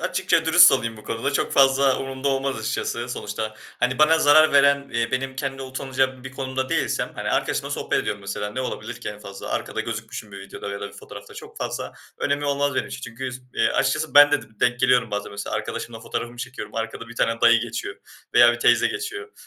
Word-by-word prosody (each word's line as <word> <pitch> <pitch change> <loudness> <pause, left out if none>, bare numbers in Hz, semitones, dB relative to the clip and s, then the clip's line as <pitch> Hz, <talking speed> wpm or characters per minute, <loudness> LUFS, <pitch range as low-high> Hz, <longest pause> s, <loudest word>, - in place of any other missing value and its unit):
açıkça - - +1
dürüst - - +8
olayım 115 0 -1
bu 110 - -14
konuda 115 +5 -2
çok - - 0
fazla 135 0 +4
umurumda 135 +1 -3
olmaz 135 -1 -1
açıkçası 115 +2 -3
sonuçta. 110 -2 -4 0.3
Hani, 125 +2 +1
bana 160 +1 +5
zarar 155 0 +6
veren, 140 0 +4
eee, 115 0 -1
benim 130 +1 -2
kendi 135 0 -4
utanacağım 130 -1 -2
bir 130 - -6
konumda 130 -1 -3
değilsem, - - -1
hani, - - -3
arkadaşımla - - -1
sohbet - - -1
ediyorum 100 -1 -3
mesela 100 +1 -4
ne 130 - -4
olabilir 120 -2 -5
ki - - -5
en 105 0 -7
fazla? 100 -1 -9
Arkada - - -3
gözükmüşüm 105 - -6
bir 100 - -8
videoda 95 +1 -8
ya 100 - -5
da 100 - -5
bir - - -16
fotoğrafta - - -12
çok - - -11
fazla - - -4 0.3
önemi 145 0 -1
olmaz 140 -1 0
benim - - 0
için. - - -7
Çünkü 125 +2 -6
s 130 - -8
eee, - - +3
açıkçası 155 0 0
ben 145 0 +8
de 145 - +2
dım 110 -1 -20
denk 125 +1 +2
geliyorum 125 -2 +3
bazen 105 0 -4
mesela 100 0 -4
arkadaşımla 115 -1 -5
fotoğrafımı 120 0 -5
çekiyorum 120 -4 -7
arkada 115 +1 -4
bir 120 - -12
tane 115 0 0
dayı 120 0 +6
geçiyor 120 0 -5 0.4
veya 120 0 +7
bir 120 - -5
teyze 120 - +4
geçiyor. 430 0 -5
130 Hz, 215 wpm, -23 LUFS, 115-135 Hz, 0.4 s, dürüst